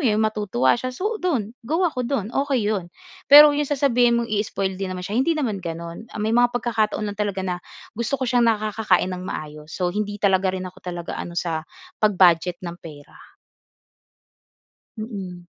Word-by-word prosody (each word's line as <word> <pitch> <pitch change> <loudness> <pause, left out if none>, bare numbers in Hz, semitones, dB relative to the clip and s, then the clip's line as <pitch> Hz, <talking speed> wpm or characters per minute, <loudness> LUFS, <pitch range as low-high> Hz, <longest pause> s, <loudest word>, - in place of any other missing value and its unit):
yun, 215 -3 +3
matutuwa 210 - +1
siya, 255 - -3
so 410 - -3
dun. 255 - -1
Go 320 +10 0
ako 255 -8 -1
dun. 240 -5 -2
Okey 265 -7 +1
yun. 185 -4 -3 0.4
Pero 295 +1 +10
yung 290 -1 -1
sasabihin 245 -4 +3
mong 235 -2 -2
ii-spoil 195 -2 -2
din 195 - -2
naman 180 - -6
siya 200 - -6
hindi 325 +3 +1
naman 220 -10 -1
ganun. 170 +5 -7
Ah - - -11
may 215 +1 -1
mga 245 +1 +5
pagkakataon 220 -3 0
lang 205 0 -5
talaga 195 -2 -1
na 180 -1 -3 0.3
gusto 235 +5 -2
ko 260 - -2
siyang 240 -2 +3
nakakakain 210 -4 +1
ng 180 - -5
maayos. 150 0 -7
So 180 -1 -1
hindi 205 0 -2
talaga 190 -2 +2
rin 185 - -5
ako 185 0 -10
talaga 175 -1 -5
ano 170 0 -7
sa 160 -2 -2 0.3
pag-budget 180 -4 +4
ng 175 0 -7
pera. 150 -3 -14 1.6
Mm, 190 -6 -7
210 Hz, 175 wpm, -23 LUFS, 180-240 Hz, 1.6 s, Pero